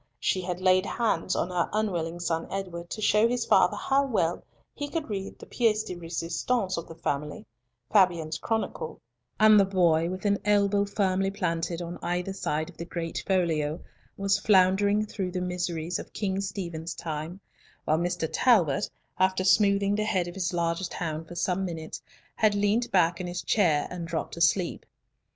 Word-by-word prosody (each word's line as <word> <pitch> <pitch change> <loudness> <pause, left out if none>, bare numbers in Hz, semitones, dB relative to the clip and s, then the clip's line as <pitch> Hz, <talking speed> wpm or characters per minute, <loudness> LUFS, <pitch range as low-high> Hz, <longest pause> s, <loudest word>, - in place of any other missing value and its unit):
She 185 - 0
had 180 0 -4
laid 185 +1 +4
hands 230 -5 0
on 180 - -1
her 175 -2 0
unwilling 175 -6 -1
son 165 -1 -1
Edward 180 -3 -5
to 215 - -5
show 210 +2 +4
his 245 0 -1
father - - +4
how 275 +1 +2
well 175 -9 0 0.3
he 290 - -4
could 300 -5 -4
read 195 -1 -4
the - - -11
piece 220 -3 +1
de 200 - -6
resistance 175 +5 -2
of 170 - -5
the 165 - -10
family, 145 -1 -3 0.5
Fabyan's 170 -6 +3
Chronicle; 220 -7 -3 0.4
and 215 -1 +7
the - - +6
boy, 170 -4 +2
with 185 +3 -6
an 200 0 +2
elbow 205 -1 +3
firmly 195 -1 0
planted 170 -3 -2
on 175 +1 -7
either 180 +2 -2
side 155 -4 -2
of 180 - -14
the 170 - -5
great 165 -1 -4
folio, 165 -4 +1 0.4
was 195 0 +1
floundering 200 +1 +4
through 195 -3 -4
the 185 - -1
miseries 175 -2 -2
of - - -10
King 195 -2 -1
Stephen's 175 -4 -5
time; 160 +3 -5 0.5
while 155 +1 +2
Mr. 175 -2 -1
Talbot, 185 - +3 0.3
after 185 0 +2
smoothing 200 0 +4
the 210 +1 0
head 185 -5 0
of 175 - -6
his 185 -2 -2
largest 170 +1 -1
hound 160 -1 -4
for 175 - -9
some 180 +2 0
minutes, 165 -3 -5 0.3
had 215 -2 +2
leant 205 +4 +1
back 175 -1 +2
in 180 - -4
his 175 0 -4
chair 165 -9 +2
and 175 -2 -5
dropped 165 -1 -3
asleep. 170 +1 +1
185 Hz, 175 wpm, -27 LUFS, 170-200 Hz, 0.5 s, and